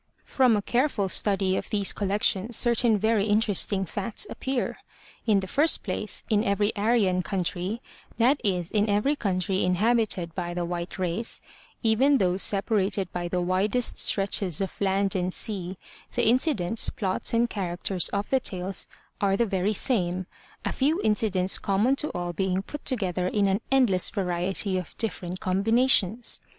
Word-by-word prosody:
From 250 Hz, -5 st, +2 dB
a 205 Hz, -, -3 dB
careful 240 Hz, -6 st, 0 dB
study 195 Hz, -1 st, +2 dB
of -, -, -4 dB
these 205 Hz, -2 st, +2 dB
collections 205 Hz, +2 st, 0 dB
certain 235 Hz, -2 st, +4 dB
very 215 Hz, 0 st, +1 dB
inter 210 Hz, 0 st, +2 dB
esting 195 Hz, 0 st, +2 dB
facts 205 Hz, -, 0 dB
appear. 265 Hz, -2 st, -3 dB, 0.5 s
In 205 Hz, -3 st, +3 dB
the 190 Hz, -, -6 dB
first 295 Hz, -, +1 dB
place, -, -, -1 dB
in 215 Hz, -2 st, +1 dB
every 205 Hz, +1 st, 0 dB
Aryan 205 Hz, -4 st, +1 dB
country, 185 Hz, +4 st, -3 dB, 0.3 s
that 255 Hz, +5 st, +3 dB
is 180 Hz, -5 st, -1 dB
every 210 Hz, +6 st, +1 dB
country 190 Hz, -5 st, -1 dB
inhabited 190 Hz, -2 st, +1 dB
by 175 Hz, -1 st, -4 dB
the 175 Hz, -1 st, -2 dB
white 175 Hz, +1 st, -5 dB
race, 185 Hz, +5 st, -1 dB, 0.4 s
even 260 Hz, +6 st, +3 dB
those 185 Hz, -3 st, +1 dB
separated 195 Hz, -2 st, +1 dB
by 175 Hz, -1 st, -3 dB
the 180 Hz, +1 st, -2 dB
widest 195 Hz, +7 st, 0 dB
stretches 195 Hz, -4 st, +1 dB
of 195 Hz, 0 st, -5 dB
land 195 Hz, +1 st, +1 dB
and 180 Hz, 0 st, -1 dB
sea, 185 Hz, -2 st, -2 dB, 0.4 s
the 240 Hz, -, +1 dB
incidents, 230 Hz, -, +2 dB
plots 190 Hz, -3 st, -2 dB
and 235 Hz, +1 st, +2 dB
characters 185 Hz, -3 st, -2 dB
of 200 Hz, 0 st, -3 dB
the 265 Hz, -, +3 dB
tales 190 Hz, -5 st, -1 dB, 0.3 s
are 195 Hz, -1 st, +2 dB
the 235 Hz, -, +2 dB
very 195 Hz, -1 st, -1 dB
same, 185 Hz, -6 st, +1 dB, 0.4 s
a -, -, -1 dB
few 300 Hz, +6 st, 0 dB
incidents 200 Hz, -3 st, +2 dB
common 210 Hz, +7 st, +1 dB
to 300 Hz, -, 0 dB
all 175 Hz, 0 st, -4 dB
being 190 Hz, +2 st, -1 dB
put 295 Hz, +7 st, -9 dB
together 185 Hz, -8 st, -1 dB
in 205 Hz, +1 st, +1 dB
an 195 Hz, +3 st, 0 dB
endless 240 Hz, -9 st, +3 dB
variety 185 Hz, 0 st, 0 dB
of 180 Hz, -, -10 dB
different 185 Hz, -5 st, -3 dB
combinations. 225 Hz, +3 st, +2 dB
200 Hz, 155 wpm, -26 LUFS, 185-225 Hz, 0.5 s, certain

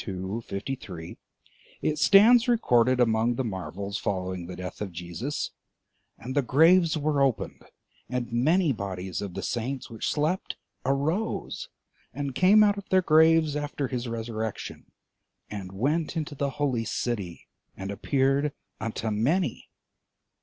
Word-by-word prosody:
52, 95 Hz, +3 st, -4 dB
53, 100 Hz, -6 st, -6 dB, 0.7 s
it 150 Hz, -1 st, 0 dB
stands 225 Hz, -, +7 dB
recorded 130 Hz, -, +3 dB
among 115 Hz, 0 st, +3 dB
the 130 Hz, -, -1 dB
marvels 100 Hz, -1 st, -4 dB
following 95 Hz, -2 st, -3 dB
the 90 Hz, -, -7 dB
death 90 Hz, +1 st, -7 dB
of 100 Hz, -3 st, -3 dB
Jesus: 90 Hz, -, -4 dB, 0.7 s
"And 130 Hz, -, -6 dB
the 145 Hz, -, +4 dB
graves 165 Hz, +5 st, +4 dB
were 150 Hz, -1 st, +1 dB
opened; 135 Hz, -4 st, 0 dB, 0.5 s
and 125 Hz, -1 st, -3 dB
many 155 Hz, +7 st, +3 dB
bodies 95 Hz, -5 st, -4 dB
of 100 Hz, -3 st, -6 dB
the -, -, -4 dB
saints 125 Hz, +2 st, -3 dB
which 115 Hz, -, -3 dB
slept 155 Hz, +5 st, -1 dB, 0.3 s
arose, 160 Hz, -, -1 dB, 0.5 s
and 140 Hz, -2 st, -3 dB
came 200 Hz, +8 st, +6 dB
out 205 Hz, -1 st, +3 dB
of 200 Hz, -, -13 dB
their 185 Hz, -1 st, +4 dB
graves 160 Hz, -1 st, +5 dB
after 145 Hz, -2 st, -3 dB
his 125 Hz, -1 st, -3 dB
resurrection, 110 Hz, -2 st, -5 dB, 0.6 s
and 100 Hz, -3 st, -6 dB
went 150 Hz, -, -1 dB
into 155 Hz, -2 st, -3 dB
the 140 Hz, 0 st, -1 dB
holy 130 Hz, -6 st, 0 dB
city, 100 Hz, -10 st, -3 dB, 0.3 s
and 95 Hz, +1 st, -5 dB
appeared 135 Hz, +6 st, +1 dB, 0.3 s
unto 110 Hz, -1 st, -3 dB
many." 130 Hz, -, 0 dB
130 Hz, 135 wpm, -27 LUFS, 105-155 Hz, 0.7 s, stands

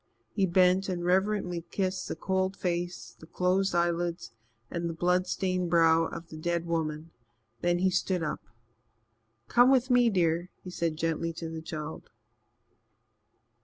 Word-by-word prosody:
He 195 Hz, -2 st, +1 dB
bent 185 Hz, +2 st, +3 dB
and 175 Hz, -2 st, -2 dB
reverently 185 Hz, -2 st, +1 dB
kissed 190 Hz, -1 st, -2 dB
the -, -, -4 dB
cold 190 Hz, 0 st, -1 dB
face, 175 Hz, -9 st, -3 dB
the 160 Hz, -, -13 dB
closed 185 Hz, +2 st, +1 dB
eyelids 170 Hz, -5 st, 0 dB, 0.4 s
and 170 Hz, 0 st, -2 dB
the 165 Hz, -, -5 dB
blood 180 Hz, +2 st, +1 dB
stained 185 Hz, -2 st, -1 dB
brow 165 Hz, -1 st, +4 dB
of 165 Hz, 0 st, -7 dB
the 155 Hz, -, -9 dB
dead 170 Hz, +1 st, -1 dB
woman. 160 Hz, -1 st, -3 dB, 0.5 s
Then 175 Hz, 0 st, +2 dB
he 185 Hz, +1 st, +2 dB
stood 180 Hz, -1 st, 0 dB
up. 150 Hz, -, -3 dB, 1.1 s
"Come 245 Hz, +1 st, +5 dB
with 260 Hz, -1 st, +3 dB
me, 245 Hz, -1 st, +5 dB
dear," 175 Hz, -3 st, +1 dB
he 180 Hz, -, -8 dB
said 165 Hz, -3 st, -2 dB
gently 165 Hz, +1 st, -1 dB
to 165 Hz, 0 st, -6 dB
the 160 Hz, 0 st, -6 dB
child. 160 Hz, -1 st, -7 dB
175 Hz, 150 wpm, -29 LUFS, 165-185 Hz, 1.1 s, Come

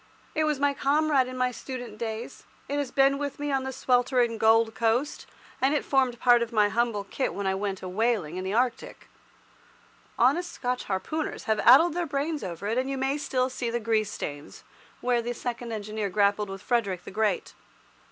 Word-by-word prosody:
It 310 Hz, 0 st, +1 dB
was 300 Hz, -3 st, 0 dB
my 285 Hz, 0 st, +2 dB
comrade 280 Hz, -1 st, +2 dB
in 255 Hz, 0 st, -7 dB
my 255 Hz, 0 st, +1 dB
student 245 Hz, -4 st, -7 dB
days, 225 Hz, 0 st, -5 dB, 0.2 s
it 285 Hz, +1 st, -1 dB
has 285 Hz, -3 st, -2 dB
been 275 Hz, +1 st, +3 dB
with 285 Hz, -1 st, -4 dB
me 290 Hz, 0 st, -2 dB
on 270 Hz, -1 st, 0 dB
the 265 Hz, -, -3 dB
sweltering 245 Hz, -2 st, +1 dB
Gold 225 Hz, 0 st, +4 dB
Coast, 235 Hz, +6 st, 0 dB, 0.3 s
and 275 Hz, +3 st, +3 dB
it -, -, -1 dB
formed 260 Hz, -3 st, +1 dB
part 245 Hz, -1 st, +5 dB
of 235 Hz, 0 st, -2 dB
my 210 Hz, -2 st, +3 dB
humble 230 Hz, -2 st, 0 dB
kit 230 Hz, +7 st, -3 dB
when 200 Hz, -, -3 dB
I 190 Hz, -, +1 dB
went 195 Hz, -1 st, -3 dB
a -, -, -4 dB
whaling 195 Hz, -4 st, 0 dB
in 185 Hz, -, -3 dB
the 190 Hz, -, -3 dB
Arctic. 245 Hz, +2 st, -2 dB, 1.1 s
Honest 350 Hz, +1 st, +2 dB
Scotch 250 Hz, -1 st, -3 dB
harpooners 300 Hz, +11 st, -3 dB
have 220 Hz, -1 st, 0 dB
addled 300 Hz, +8 st, +7 dB
their 345 Hz, 0 st, -2 dB
brains 290 Hz, +1 st, -2 dB
over 180 Hz, 0 st, -6 dB
it, 225 Hz, +4 st, 0 dB
and 260 Hz, +1 st, -2 dB
you 275 Hz, -, -2 dB
may 265 Hz, +1 st, 0 dB
still 255 Hz, -3 st, 0 dB
see 250 Hz, -2 st, -3 dB
the 240 Hz, +1 st, -1 dB
grease 215 Hz, -2 st, 0 dB
stains 145 Hz, -5 st, -7 dB, 0.4 s
where 245 Hz, -1 st, +1 dB
the 240 Hz, +1 st, -3 dB
second 240 Hz, 0 st, -5 dB
engineer 215 Hz, -1 st, -3 dB
grappled 205 Hz, +1 st, +1 dB
with 195 Hz, 0 st, -7 dB
Frederick 200 Hz, -8 st, 0 dB
the -, -, -9 dB
Great. 210 Hz, -2 st, -1 dB
240 Hz, 200 wpm, -27 LUFS, 215-270 Hz, 1.1 s, addled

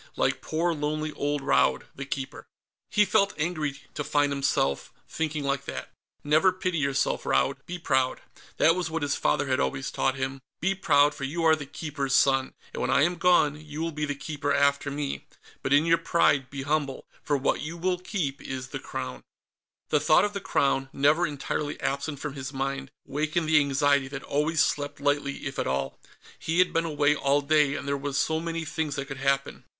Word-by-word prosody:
Like -, -, +1 dB
poor 165 Hz, +2 st, 0 dB
lonely 155 Hz, 0 st, -2 dB
old 145 Hz, 0 st, -1 dB
Raud 140 Hz, -, +3 dB
the 140 Hz, -, -6 dB
Keeper. 135 Hz, -1 st, -5 dB, 0.4 s
He 210 Hz, -, +4 dB
felt 200 Hz, -1 st, +2 dB
angry 155 Hz, -3 st, -1 dB, 0.2 s
to 145 Hz, -, -3 dB
find 145 Hz, 0 st, +2 dB
himself 135 Hz, -, 0 dB, 0.2 s
thinking 155 Hz, -2 st, -2 dB
like 140 Hz, -1 st, -1 dB
that. -, -, -6 dB, 0.3 s
Never 155 Hz, +6 st, +4 dB
pity 185 Hz, -2 st, -2 dB
yourself, 140 Hz, -1 st, 0 dB
Raud; 65 Hz, 0 st, +1 dB
be 180 Hz, -, -4 dB
proud. 130 Hz, -6 st, +1 dB, 0.4 s
That 165 Hz, -, +5 dB
was 180 Hz, -2 st, -2 dB
what 160 Hz, -1 st, -2 dB
his 145 Hz, -1 st, +1 dB
father -, -, +1 dB
had 130 Hz, -1 st, 0 dB
always 135 Hz, -1 st, -1 dB
taught 130 Hz, -, 0 dB
him: 135 Hz, 0 st, -3 dB, 0.2 s
"Be 190 Hz, +4 st, +1 dB
proud, 145 Hz, -6 st, +4 dB
for 140 Hz, -, -8 dB
you 160 Hz, +5 st, -2 dB
are 160 Hz, -1 st, +6 dB
the 145 Hz, -3 st, -8 dB
Keeper's 140 Hz, -3 st, -2 dB
son, 135 Hz, -1 st, +3 dB, 0.2 s
and -, -, -4 dB
when -, -, 0 dB
I 140 Hz, -, +4 dB
am 175 Hz, +2 st, +1 dB
gone, 155 Hz, -4 st, +3 dB
you 150 Hz, 0 st, -8 dB
will 165 Hz, +1 st, -1 dB
be 150 Hz, -1 st, -2 dB
the 145 Hz, -1 st, -3 dB
Keeper 145 Hz, 0 st, -3 dB
after 140 Hz, 0 st, +2 dB
me. 140 Hz, 0 st, -4 dB, 0.3 s
But 130 Hz, -, -3 dB
in 145 Hz, +3 st, +5 dB
your 165 Hz, 0 st, +4 dB
pride, 145 Hz, -6 st, +2 dB
be 140 Hz, -1 st, -5 dB
humble, 145 Hz, -2 st, -1 dB, 0.2 s
for 145 Hz, -, 0 dB
what 135 Hz, -, 0 dB
you 160 Hz, +3 st, -5 dB
will 180 Hz, +1 st, 0 dB
keep 175 Hz, -8 st, -3 dB
is 130 Hz, -1 st, -5 dB
the -, -, -5 dB
Crown." 65 Hz, 0 st, -6 dB, 0.7 s
The 150 Hz, -, +3 dB
thought 155 Hz, +5 st, +5 dB
of 205 Hz, -, -3 dB
the 200 Hz, -, -4 dB
Crown, 135 Hz, -4 st, +1 dB
never 150 Hz, +5 st, +3 dB
entirely 145 Hz, 0 st, -3 dB
absent 140 Hz, +2 st, -2 dB
from 150 Hz, -1 st, -4 dB
his 135 Hz, -1 st, -6 dB
mind, 135 Hz, 0 st, -3 dB, 0.2 s
wakened 155 Hz, +3 st, -1 dB
the 155 Hz, -1 st, +6 dB
anxiety 140 Hz, -1 st, +2 dB
that 135 Hz, 0 st, -7 dB
always 150 Hz, +2 st, +1 dB
slept 145 Hz, -1 st, -2 dB
lightly 145 Hz, 0 st, -1 dB
if 135 Hz, 0 st, -4 dB
at -, -, -1 dB
all. 65 Hz, 0 st, -2 dB, 0.4 s
He 165 Hz, +1 st, -2 dB
had 185 Hz, 0 st, +4 dB
been 165 Hz, 0 st, +1 dB
away 150 Hz, -2 st, +2 dB
all 140 Hz, 0 st, +2 dB
day, 145 Hz, -1 st, +3 dB
and 145 Hz, -, -5 dB
there 140 Hz, -, +1 dB
were 140 Hz, 0 st, -4 dB
so 160 Hz, +3 st, +1 dB
many 165 Hz, 0 st, -3 dB
things 155 Hz, -1 st, -2 dB
that 140 Hz, -2 st, -3 dB
could 135 Hz, 0 st, -7 dB
happen. 135 Hz, +1 st, 0 dB
145 Hz, 205 wpm, -27 LUFS, 140-160 Hz, 0.7 s, are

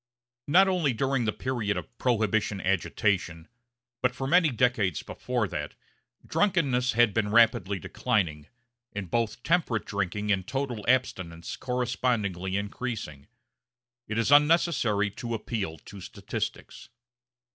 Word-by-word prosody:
Not 185 Hz, +6 st, +6 dB
only 175 Hz, -8 st, +1 dB
during 135 Hz, +1 st, 0 dB
the 105 Hz, -, +1 dB
period 115 Hz, -4 st, -2 dB
of -, -, -7 dB
Prohibition 110 Hz, -4 st, +1 dB
agitation, 95 Hz, -2 st, 0 dB, 0.5 s
but 125 Hz, 0 st, +1 dB
for 135 Hz, -, -4 dB
many 165 Hz, +3 st, +4 dB
decades 115 Hz, -, +1 dB
before 125 Hz, -4 st, -2 dB
that, -, -, -5 dB, 0.5 s
drunkenness 140 Hz, -11 st, +1 dB
had 120 Hz, -2 st, +4 dB
been 105 Hz, -2 st, 0 dB
rapidly 110 Hz, -3 st, +4 dB
declining, 80 Hz, -4 st, -1 dB, 0.5 s
and 95 Hz, -5 st, -6 dB
both 115 Hz, 0 st, -1 dB
temperate 165 Hz, -10 st, +1 dB
drinking 100 Hz, +1 st, -2 dB
and 95 Hz, -2 st, 0 dB
total 130 Hz, -5 st, -3 dB
abstinence 95 Hz, -10 st, 0 dB
correspondingly 120 Hz, -7 st, -1 dB
increasing. 100 Hz, -, -5 dB, 0.8 s
It 110 Hz, -, -3 dB
is 115 Hz, +3 st, +1 dB
unnecessary 145 Hz, -, +4 dB
to 115 Hz, +3 st, -4 dB
appeal 105 Hz, -7 st, -4 dB
to 100 Hz, +3 st, -12 dB
statistics. -, -, -6 dB
110 Hz, 120 wpm, -27 LUFS, 100-125 Hz, 0.8 s, Not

